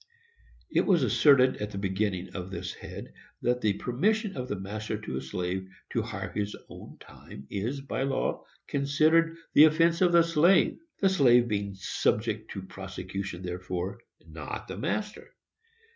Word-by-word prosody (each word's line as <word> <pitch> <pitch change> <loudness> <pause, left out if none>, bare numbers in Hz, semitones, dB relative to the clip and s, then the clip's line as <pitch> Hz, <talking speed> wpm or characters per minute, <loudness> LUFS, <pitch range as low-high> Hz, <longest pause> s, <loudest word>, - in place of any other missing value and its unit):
It - - +2
was 175 -7 +4
asserted, 130 +2 +5
at 105 - -4
the 100 - -7
beginning 95 -1 -2
of 95 -1 -5
this 90 -1 -5
head, - - -9 0.3
that 125 +1 +1
the 105 -2 +2
permission 195 - 0
of 125 0 -4
the 105 - -2
master 105 +3 -4
to 65 - -5
a - - -3
slave 90 +7 -3 0.2
to - - 0
hire - - -5
his 105 0 -3
own - - -11
time 70 - -12
is, 120 +8 -2
by 135 -1 -4
law, 135 0 -1 0.2
considered 155 +4 +2 0.2
the 150 - +9
offence 165 +2 +3
of 180 -2 +5
the 170 -1 +6
slave; 170 +3 +4 0.2
the 195 - +5
slave 125 -9 +5
being 100 -2 -2
subject 110 +3 -1
to 95 - -6
prosecution 95 -1 -6
therefor, 90 +1 -4 0.3
not 80 -2 -7
the - - -6
master. 210 0 -4
110 Hz, 160 wpm, -28 LUFS, 95-150 Hz, 0.3 s, the